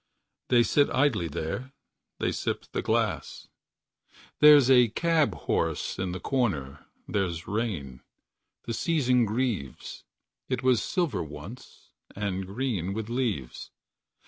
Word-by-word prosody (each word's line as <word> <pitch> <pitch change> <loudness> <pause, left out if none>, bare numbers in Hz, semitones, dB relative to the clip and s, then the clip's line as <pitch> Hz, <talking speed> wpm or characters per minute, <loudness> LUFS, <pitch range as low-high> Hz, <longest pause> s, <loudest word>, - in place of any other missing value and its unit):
They 120 -2 +5
sit 145 +6 +3
idly 130 -11 +1
there. 80 - -5 0.4
They - - 0
sip - - -3
the - - -2
glass. - - -1 0.9
There's 150 -3 +8
a 125 -2 +6
cab 155 - +1
horse 80 +2 -1
at 95 -1 -2
the 90 - -5
corner. 85 - -2 0.2
There's 85 -4 -2
rain. 95 - -3 0.6
The 115 - -4
season 125 -3 +2
grieves. 110 - -3 0.5
It 130 0 -2
was 130 -3 +3
silver 155 - -1
once. 80 - -10 0.2
And 95 -2 -3
green 100 -4 -2
with 110 0 -4
leaves 115 - -3
110 Hz, 120 wpm, -27 LUFS, 90-130 Hz, 0.9 s, There's